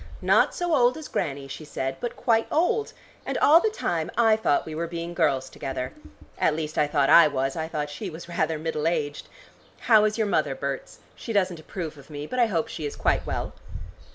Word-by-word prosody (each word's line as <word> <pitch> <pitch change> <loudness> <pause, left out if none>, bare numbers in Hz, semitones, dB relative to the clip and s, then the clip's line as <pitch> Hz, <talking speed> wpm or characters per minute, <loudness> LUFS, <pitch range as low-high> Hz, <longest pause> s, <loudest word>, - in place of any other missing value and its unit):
'Not - - +3
so 350 -2 -1
old 250 -2 +4
as 315 - -7
Grannie,' 140 -1 -3
she 135 +3 -8
said, 135 -3 -4
'but 240 - -4
quite 230 -2 +1
old!' 425 +8 +1 0.3
And - - -3
all 315 +3 +7
the 440 - +1
time 170 - -2
I 225 -2 +5
thought 215 -9 +1
we 160 - -7
were 165 +2 -3
being 170 0 -5
girls 135 -5 +1
together. 130 -1 -5 0.5
At 155 - +2
least 155 -1 -4
I 150 - +2
thought 145 -2 +2
I 170 -2 +9
was; 135 -2 -1
I 160 -1 -3
thought 150 -2 -3
she 195 +6 -5
was 165 +1 -9
rather 160 -2 -1
middle 155 0 -2
aged. 145 -3 -2 0.5
How 220 -3 +5
is 215 +1 0
your 220 - +1
mother, 150 -8 0
Berts? 140 0 -5
She 230 - -6
doesn't 185 -4 +1
approve 155 -2 -6
of 140 - -16
me, 145 -1 -6
but 255 +11 -4
I 240 - +5
hope 170 -7 -1
she 155 -3 -4
is - - -7
quite - - 0
well." - - -3
160 Hz, 215 wpm, -25 LUFS, 145-220 Hz, 0.5 s, I